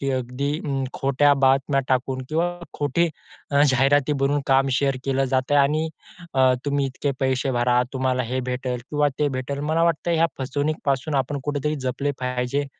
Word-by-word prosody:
की 140 -1 -1
अगदी 130 +3 -2
अं, 135 -3 -1
खोट्या 140 +2 +3
बातम्या 135 +1 +3
टाकून 130 0 0
किंवा 165 +3 +1 0.2
खोटी 150 +4 +1 0.4
अ, 140 0 +4
जाहिराती 140 +1 +3
बनवून 145 +1 +1
काम 135 0 +3
शेअर 135 -2 +1
केलं 135 0 +1
जात 130 +1 +1
आहे 145 - +6
आणि 155 +3 +1 0.5
अ, 130 -1 +5
तुम्ही 140 -1 0
इतके 135 +2 -2
पैसे 130 0 +1
भरा 125 0 +2
तुम्हाला 130 -1 0
हे 130 +3 -2
भेटेल 125 0 -2
किंवा 150 -1 +2
ते 150 - +2
भेटेल. 135 +1 -4
मला 155 +3 +1
वाटतं 170 +1 0
ह्या 165 0 +4
फसवणूकीपासून 145 +1 -1
आपण 145 +1 -5
कुठेतरी 150 +1 -1
जपले 140 +3 -1
पाहिजे. 125 +2 -1
135 Hz, 170 wpm, -23 LUFS, 130-145 Hz, 0.5 s, आहे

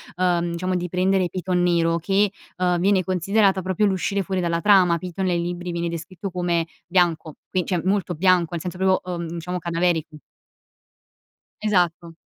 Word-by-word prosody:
uhm, 175 -1 +1
diciamo 185 +2 -2
di 180 0 -2
prendere 185 +1 +1
Piton 180 0 -1
nero 170 -1 +2
che, 195 +3 +1 0.3
uhm, 180 -1 +1
viene 190 +1 +3
considerata 190 +2 +2
proprio 190 +3 0
l'uscire 195 0 0
fuori 190 0 -2
dalla 170 -1 0
trama. 185 -5 +5
Piton 180 +2 -4
nel 175 -2 +1
libri 175 +1 -4
viene 170 0 -2
descritto 175 +3 -6
come 175 -2 0 0.2
bianco, 170 -4 +1 0.2
quin 185 -2 0
cioè 180 -3 0
molto 190 -2 0
bianco, 180 0 +3
nel 170 - -3
senso 180 0 -5
proprio, 190 -1 +1
uhm, 170 -1 -4
diciamo 170 +2 -4
cadaverico. 165 -2 -1 1.4
Esatto. 175 -5 0
180 Hz, 160 wpm, -23 LUFS, 170-190 Hz, 1.4 s, trama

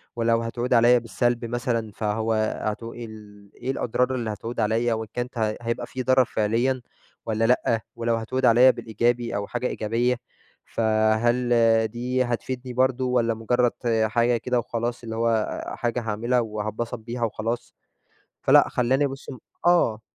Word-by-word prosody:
ولو 115 0 +2
هتعود 120 +2 -2
عليّا 120 +1 +6
بالسّلب 120 +1 -1
مثلًا 115 -2 -2
فهو 110 +1 -1 0.3
هتو 115 +2 -4
إيه 120 -1 -7
ال 105 -2 -13
إيه 130 - -3
الأضرار 125 +1 0
اللي 120 -3 -3
هتعود 115 +3 -6
عليّا؟ 115 +2 +1
وإن 110 0 -3
كانت 125 0 -4
هي 110 -1 0
هيبقى 120 0 -3
في 130 -1 -5
ضرر 130 0 +4
فعليّا 120 +5 0 0.4
والّا 110 0 0
لأ؟ 115 -2 +2
ولو 115 0 0
هتعود 125 +3 -1
عليّا 125 +3 +7
بالإيجابي 120 +1 -1
أو 100 0 -2
حاجة 125 +1 -2
إيجابية، 120 +3 0 0.5
فهل 110 +2 +1 0.4
دي 125 +3 -1
هتفيدني 125 +2 -4
برضه، 130 0 +1
والّا 120 -2 +2
مجرّد 120 +2 +1 0.3
حاجة 120 +2 +2
كده 125 +1 0
وخلاص 120 +1 -3
اللي 115 -1 -5
هو 115 -1 0
حاجة 120 +1 -1
هاعملها 115 +3 0
وهاتبسط 110 +2 -3
بيها 120 +2 -5
وخلاص؟ 115 +1 -3 0.7
فلأ، - - +5
خلّاني 130 +4 +2
ابُص 135 0 -6
م 130 - -7 0.3
آه. 170 -11 +3
120 Hz, 150 wpm, -24 LUFS, 110-125 Hz, 0.7 s, عليّا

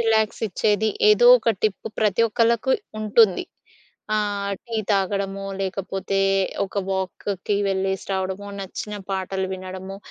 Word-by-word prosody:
రిలాక్సిచ్చేది 220 -1 +1 0.2
ఏదోక 240 +2 +7
టిప్ 215 0 0
ప్రతి 215 0 +3
ఒక్కళ్ళకు 235 +3 +2 0.3
ఉంటుంది. 215 -2 +4 0.7
ఆహ్, 205 -1 -1
టీ 230 -1 -4
తాగడమో, 195 0 0 0.2
లేకపోతే 195 0 -2 0.5
ఒక 200 - -4
వాక్‌కి 190 +1 -2
వెళ్ళేసి 190 0 -1
రావడమో, 190 +1 -3
నచ్చిన 195 +2 -6 0.2
పాటలు 190 0 -2
వినడమో, 190 +1 -7
200 Hz, 100 wpm, -23 LUFS, 190-215 Hz, 0.7 s, ఏదోక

